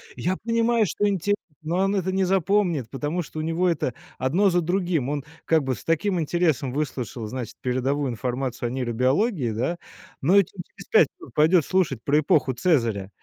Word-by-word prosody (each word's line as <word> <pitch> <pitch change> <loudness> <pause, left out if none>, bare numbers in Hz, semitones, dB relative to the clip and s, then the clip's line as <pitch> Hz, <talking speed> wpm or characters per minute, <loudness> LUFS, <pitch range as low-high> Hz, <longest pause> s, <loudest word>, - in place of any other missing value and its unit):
Я 185 +2 -1
понимаю, 230 -1 +2
что 205 +6 0
инте 200 +1 +1 0.3
но 170 +3 -1
он 195 +1 +2
это 190 -1 0
не 190 0 +2
запомнит, 180 - +1
потому 150 +7 -2
что 155 0 -7
у - - -1
него 165 +3 0
это 145 -7 0 0.2
одно 180 +10 +2
за 175 0 +2
другим. 175 -5 0
Он 145 -2 -2 0.2
как 160 -3 +3
бы 130 -1 -1
с 100 - -12
таким 175 +3 +1
интересом 155 -5 0
выслушал, 130 -5 -3
значит, 125 0 -6
передовую 130 +2 0
информацию 125 +1 -3
о - - -3
нейробиологии, 130 - 0
да? 130 +11 -1 0.4
Но 180 +9 +5
че 175 - -5 0.2
через - - -14
5 - - +6
минут 360 - -13
пойдет 160 +2 +4
слушать 165 -11 0
про 150 +2 +3
эпоху 145 -3 +2
Цезаря. 115 - +1
155 Hz, 180 wpm, -24 LUFS, 130-185 Hz, 0.4 s, 5